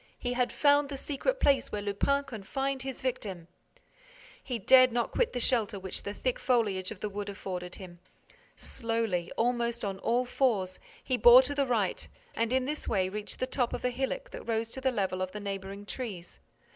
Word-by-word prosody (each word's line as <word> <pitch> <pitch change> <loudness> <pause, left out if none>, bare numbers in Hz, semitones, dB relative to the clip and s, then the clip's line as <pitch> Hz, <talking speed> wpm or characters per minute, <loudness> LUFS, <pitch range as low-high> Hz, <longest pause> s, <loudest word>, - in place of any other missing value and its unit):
He 245 0 -2
had 250 0 +1
found 285 -1 +4
the 280 - -4
secret 310 - -2
place 275 -1 +3
where 205 -1 -3
Lupin 280 +8 +1
confined 270 +3 -3
his 265 0 -6
victim. 200 -9 -3 1.0
He 250 -3 -3
dared 255 +4 +6
not 235 0 0
quit - - +1
the 250 - -2
shelter 230 -4 +1
which 190 -1 -5
the 200 - -4
thick 250 +4 -2
foliage 210 -7 +1
of 220 - -9
the 210 - -1
wood 205 0 -5
afforded 180 -3 -5
him. 175 -3 -11 0.6
Slowly, 225 -7 -2
almost 235 -1 0
on 195 -1 -3
all 245 +4 +1
fours, 215 -8 0 0.2
he 255 - 0
bore 240 +3 +9
to 285 +2 -1
the 280 -1 +1
right 220 -6 0 0.3
and 230 +1 0
in 260 0 +2
this 300 +3 -4
way 190 -3 +1
reached 210 +1 -6
the 255 - 0
top 255 -2 -1
of - - -3
a 250 - +2
hillock 270 - -3
that - - -9
rose 225 0 -1
to 265 - -6
the 260 0 +2
level 190 -5 -1
of 185 0 -3
the 210 - -5
neighboring 200 0 -5
trees. 205 -7 -6
230 Hz, 195 wpm, -30 LUFS, 200-260 Hz, 1.0 s, bore